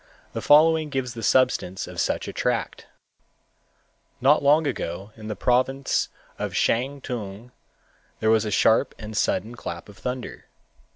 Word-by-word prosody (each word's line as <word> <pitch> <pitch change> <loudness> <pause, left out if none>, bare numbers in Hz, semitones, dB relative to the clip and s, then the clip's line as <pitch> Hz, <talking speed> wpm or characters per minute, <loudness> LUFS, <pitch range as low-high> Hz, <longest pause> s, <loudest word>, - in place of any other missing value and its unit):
The - - -3
following 155 +1 +5
gives 130 -3 -3
the 115 - -7
substance 120 -6 +2
of - - -4
such - - -1
a - - -5
tract: - - -2 1.3
Not 140 +4 +4
long 150 +3 +4
ago 100 -6 -4
in 110 -1 -10
the 105 - -3
province 130 +4 +1 0.3
of - - -3
Shantung, 120 -4 -2 0.7
there 110 - +2
was 110 -1 +4
a 110 - -2
sharp 105 +3 +3
and 110 -1 -8
sudden 105 +2 0
clap 85 -6 -7
of 105 - -15
thunder. 125 0 -5
120 Hz, 140 wpm, -24 LUFS, 105-135 Hz, 1.3 s, following